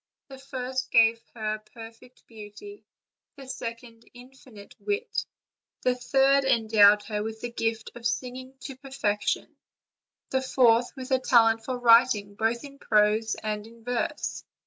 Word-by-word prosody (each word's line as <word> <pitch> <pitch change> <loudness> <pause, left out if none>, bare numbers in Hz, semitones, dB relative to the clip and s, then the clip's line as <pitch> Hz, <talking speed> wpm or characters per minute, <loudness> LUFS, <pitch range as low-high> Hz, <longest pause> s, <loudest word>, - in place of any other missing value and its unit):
The 270 -1 -11
first 260 -1 -4
gave 230 0 +4
her 215 -1 -3
perfect 225 +3 -14
beauty; 225 - -12 0.5
the 275 -2 -11
second, 230 -2 -7
infinite 245 -4 -15
wit; 415 +3 -3 0.6
the 250 - +3
third 270 +2 +3
en 235 -4 +2
dowed 210 -1 +6
her 210 0 -3
with 220 +1 -6
the 240 - -5
gift 225 -1 -3
of 240 -1 -3
singing 255 +2 -5
to 270 - -7
perfection; 260 -6 -2 0.8
the 265 - +1
fourth, 245 -2 +3
with 260 -1 -8
a 260 - +3
talent 225 -3 +4
for 255 +1 -3
writing, 230 -4 +4
both 225 +3 -1
in 280 -1 -12
prose 215 0 +2
and 215 +2 -6
verse. 245 -1 -3
235 Hz, 140 wpm, -26 LUFS, 220-260 Hz, 0.8 s, dowed